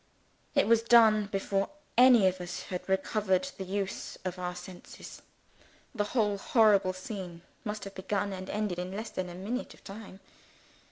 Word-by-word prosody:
It - - +4
was 230 0 +5
done 220 -3 +5
before 195 0 -1 0.3
any 245 -4 +7
of 185 -1 +1
us 175 0 -5
had 180 0 -6
recovered 190 +4 +1
the - - -2
use 195 +1 -4
of 185 0 -3
our 180 0 -3
senses. 180 0 -11 0.7
The 210 -4 0
whole 205 -3 +2
horrible 210 -7 +4
scene 185 -3 -7 0.2
must 210 -2 -4
have 195 - -7
begun 200 +1 -2
and 185 0 -7
ended 210 -4 -2
in 180 +2 -4
less 220 +1 -5
than 185 - -3
half 175 - -8
a - - -9
minute 235 +7 -4
of - - -23
time. 195 -1 -10
195 Hz, 170 wpm, -30 LUFS, 185-215 Hz, 0.7 s, any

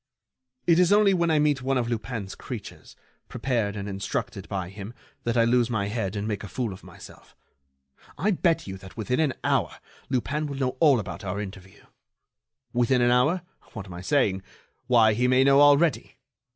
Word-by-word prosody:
It 170 0 +4
is 180 0 +4
only 205 -1 +5
when 170 -2 +1
I 160 - +3
meet 150 -2 +2
one 135 +1 0
of 120 -2 -1
Lupin's 115 -3 -4
creatures, - - -9 0.3
prepared 115 -5 -1
and 100 -1 -5
instructed 100 -1 -4
by 95 -3 -3
him, 100 +4 -9 0.3
that 120 0 0
I 115 - +5
lose 120 0 +2
my 100 -4 -1
head 105 -3 -3
and 105 +1 -3
make 105 -2 -3
a - - -6
fool 115 -2 -3
of 95 - -13
myself.... - - -14 0.8
I 195 +9 +1
bet 170 -3 +1
you 95 -1 -7
that 95 +1 -13
within 115 +5 -1
an 150 -5 +1
hour - - 0 0.3
Lupin 140 +4 -1
will 140 -1 -6
know 130 -2 -1
all 145 -6 +5
about 105 - -7
our 100 +1 -3
interview. 95 -2 -9 0.9
Within 125 +1 +2
an 120 - +4
hour? 150 +8 +2 0.3
What 100 -3 -7
am 95 - -10
I 85 - -7
saying?... 100 -5 +1 0.5
Why, 115 -3 +5
he 125 +4 +1
may 130 +1 +4
know 140 +1 +5
already. 145 +2 +3
120 Hz, 190 wpm, -26 LUFS, 100-140 Hz, 0.9 s, only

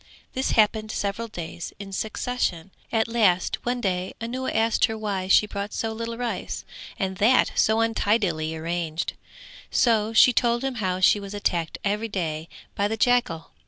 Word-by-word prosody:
This 260 +1 0
happened 215 0 +3
several 205 +3 -2
days 170 -5 -7
in 195 -1 -8
succession; 195 -4 -2 0.2
at 225 0 +2
last 210 -6 +2
one 245 0 -1
day 185 -2 -2
Anuwa 250 +3 -3
asked 225 0 +3
her 220 - -4
why 200 -4 -2
she 195 - +5
brought 200 0 -5
so 225 -1 -2
little 230 +1 -5
rice 240 -1 -4 0.3
and 190 -1 -2
that 220 +6 +4
so 220 +1 +3
untidily 200 -8 +1
arranged; 165 0 -3 0.6
so 225 -3 +2
she 235 +2 +6
told 240 +1 +2
him 270 -1 -1
how 185 -1 -1
she 205 - +5
was 200 0 -7
attacked 170 -5 -1
every 210 +3 -1
day 165 -5 -3 0.2
by 200 - 0
the 220 +2 -3
jackal. 235 -9 +1
210 Hz, 160 wpm, -25 LUFS, 185-230 Hz, 0.6 s, she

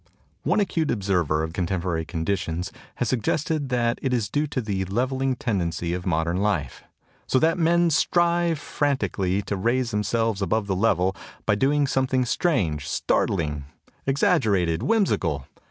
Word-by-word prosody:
One - - +1
acute 165 -6 0
observer 90 -7 +1
of 80 0 -4
contemporary 90 -2 -1
conditions 85 +1 -2 0.2
has - - -1
sug 125 -3 0
gested 150 +3 -1
that 120 -2 +1
it 130 -2 0
is 110 -5 -1
due 150 +4 +1
to 140 - -2
the 100 -5 -2
leveling 130 +6 0
tendency 85 -7 -2
of 90 +1 -4
modern 85 0 0
life, 95 -10 -1 0.4
"so - - +2
that 165 +5 +2
men 170 +1 +3
strive 170 +2 +2
frantically 105 -10 -1
to 100 - -3
raise 120 +5 0
themselves 105 0 0
above 110 +2 0
the 95 -1 -1
level 95 -2 +2 0.3
by 105 - +3
doing 140 +7 +2
some 130 -1 +1
thing 130 -1 +1
strange, 95 - 0
startling, 75 -6 0 0.4
exaggerated, 110 - +2
whimsical. 90 - +1
105 Hz, 150 wpm, -24 LUFS, 90-135 Hz, 0.4 s, men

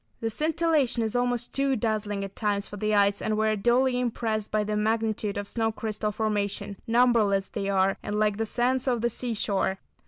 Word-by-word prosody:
The 225 0 -2
scintillation 300 -3 +1
is 220 +1 -2
almost 245 -1 0
too 275 -1 +1
dazzling 210 -3 -1
at 195 0 -7
times 205 -2 -1
for - - -8
the 215 +1 0
eyes, 200 0 +3
and 215 -1 -1
we 220 0 +2
are 215 - +1
duly 245 +4 +2
impressed 225 -3 -2
by 215 0 +1
the 210 0 -2
magnitude 215 -1 0
of 205 0 -4
snow 225 0 0
crystal 215 -1 -3
formation. 205 -2 -2
Numberless 225 -5 +3
they 195 - -3
are, 195 0 +2
and 205 0 -3
like 210 -1 +1
the 225 0 -1
sands 255 +3 0
of 245 -3 +1
the 235 0 +1
seashore. 210 -5 -1
220 Hz, 195 wpm, -27 LUFS, 205-240 Hz, -, eyes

